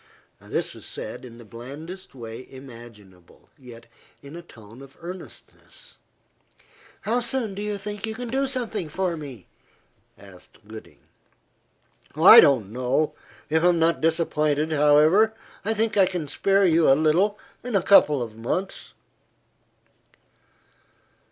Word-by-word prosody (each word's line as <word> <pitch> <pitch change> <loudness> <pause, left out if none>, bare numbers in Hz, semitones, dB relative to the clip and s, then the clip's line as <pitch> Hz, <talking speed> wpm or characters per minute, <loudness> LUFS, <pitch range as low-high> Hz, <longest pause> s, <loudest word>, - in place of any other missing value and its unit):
This - - -4
was - - -12
said - - -7
in 120 -2 -12
the 120 - -14
blandest 145 - -10
way 115 0 -9
imaginable, 115 -9 -15
yet 120 -4 -14 0.4
in 140 +3 -11
a 170 - -8
tone 115 -6 -16
of 135 -1 -15
earnestness. 185 - -12 1.0
"How 235 +3 0
soon 240 -3 -3
do 200 - -6
you 210 0 -3
think 205 +1 -6
you 220 - -5
can 245 0 -6
do 270 +3 0
something 230 - -4
for 180 +2 -2
me?" 140 - -10 0.7
asked 95 -2 -16
Gooding. 110 0 -12 1.1
"I - - +9
don't 115 -8 +4
know. 130 +5 0 0.3
If 160 +1 +1
not 170 -1 +2
disappointed, 155 -2 0
however, 155 +9 +4 0.3
I 220 +2 -1
think 220 +1 -1
I 195 -2 +4
can 175 -5 -4
spare 195 +6 +2
you 165 -3 +3
a - - +7
little 175 +7 +2 0.3
in 245 -3 -4
a 190 - +2
couple 150 -10 +5
of 110 -2 -9
months." 130 +12 -4
160 Hz, 130 wpm, -24 LUFS, 125-195 Hz, 1.1 s, I